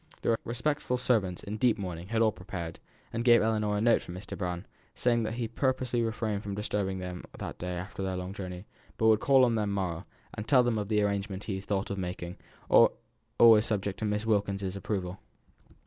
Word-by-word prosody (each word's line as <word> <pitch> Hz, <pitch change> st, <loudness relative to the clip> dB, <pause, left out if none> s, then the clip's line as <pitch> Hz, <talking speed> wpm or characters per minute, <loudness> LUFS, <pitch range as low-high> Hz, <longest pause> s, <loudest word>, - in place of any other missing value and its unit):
The 115 Hz, -, +3 dB
respectful 125 Hz, +2 st, -1 dB
servants, 105 Hz, -8 st, +1 dB
in 105 Hz, +2 st, -4 dB
deep 120 Hz, 0 st, +3 dB
mourning, 90 Hz, -3 st, -5 dB
had 115 Hz, +2 st, +2 dB
all 110 Hz, -, +4 dB
prepared, 90 Hz, -3 st, -7 dB, 0.3 s
and 115 Hz, +1 st, -1 dB
gave 120 Hz, -2 st, +6 dB
Ellinor 105 Hz, -2 st, +1 dB
a -, -, 0 dB
note 115 Hz, +1 st, +4 dB
from 90 Hz, -, -8 dB
Mr. 95 Hz, +2 st, -7 dB
Brown, 90 Hz, 0 st, -3 dB, 0.3 s
saying 120 Hz, -1 st, +2 dB
that 110 Hz, 0 st, -2 dB
he 120 Hz, -1 st, -2 dB
purposely 125 Hz, 0 st, 0 dB
refrained 110 Hz, -2 st, -1 dB
from 100 Hz, -1 st, -5 dB
disturbing 100 Hz, -2 st, -1 dB
them 90 Hz, -1 st, -6 dB
that -, -, -6 dB
day 90 Hz, 0 st, -3 dB
after 90 Hz, +2 st, -6 dB
their 95 Hz, -1 st, -1 dB
long 90 Hz, +1 st, -5 dB
journey, 90 Hz, -1 st, -6 dB, 0.3 s
but 110 Hz, -, +1 dB
would 110 Hz, -1 st, +5 dB
call 135 Hz, 0 st, +5 dB
on 120 Hz, -, +1 dB
the 105 Hz, -2 st, 0 dB
morrow, 95 Hz, -3 st, -2 dB, 0.3 s
and 105 Hz, -, -6 dB
tell 130 Hz, -3 st, +6 dB
them 120 Hz, -3 st, +1 dB
of 105 Hz, -, -3 dB
the 105 Hz, -1 st, +2 dB
arrangements 100 Hz, -1 st, -2 dB
he 105 Hz, -, -2 dB
had 95 Hz, +1 st, -5 dB
thought 100 Hz, -1 st, -1 dB
of 100 Hz, -, -3 dB
making, 90 Hz, 0 st, -5 dB, 1.0 s
always 115 Hz, -2 st, +7 dB
subject 100 Hz, -2 st, -2 dB
to 110 Hz, -, -2 dB
Miss 105 Hz, +1 st, -1 dB
Wilkins's 100 Hz, -3 st, 0 dB
approval. 95 Hz, -2 st, -3 dB
105 Hz, 205 wpm, -29 LUFS, 95-115 Hz, 1.0 s, always